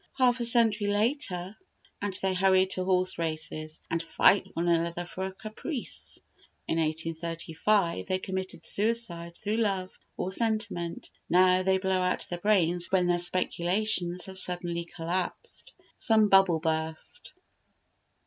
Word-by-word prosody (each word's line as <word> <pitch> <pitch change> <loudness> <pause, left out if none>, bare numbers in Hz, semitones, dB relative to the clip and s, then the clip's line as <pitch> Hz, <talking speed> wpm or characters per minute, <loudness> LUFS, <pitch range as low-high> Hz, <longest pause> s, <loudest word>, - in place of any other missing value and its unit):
Half 250 -2 +3
a 240 - -1
century 225 -3 +4
later 205 -3 -1 0.5
and 200 -2 -3
they 190 -1 +1
hurry 190 0 +4
to 185 -1 -3
horse 185 -1 +1
races, 155 -1 -4
and 165 - 0
fight 170 +4 +3
one 170 +1 -1
another 170 +1 0
for 185 +2 -5
a 190 - -4
caprice. 220 - -6 0.5
In 165 - 0
1835 165 - -1
they 185 - 0
committed 190 0 -5
suicide 200 -6 0
through 215 +1 -2
love 195 -4 -1 0.2
or 185 - -2
sentiment; 210 -6 -2 0.2
now 185 +1 +5
they 190 0 +2
blow 190 -1 0
out 180 0 +1
their 175 - -3
brains 175 -3 +1
when 185 -2 +3
their 175 0 +2
speculations 180 +1 0
have 190 -1 +1
suddenly 175 -2 +1
collapsed, 175 +2 -5 0.3
some 220 -3 +3
bubble 195 -4 +5
burst. 160 0 -3
185 Hz, 135 wpm, -28 LUFS, 170-205 Hz, 0.5 s, now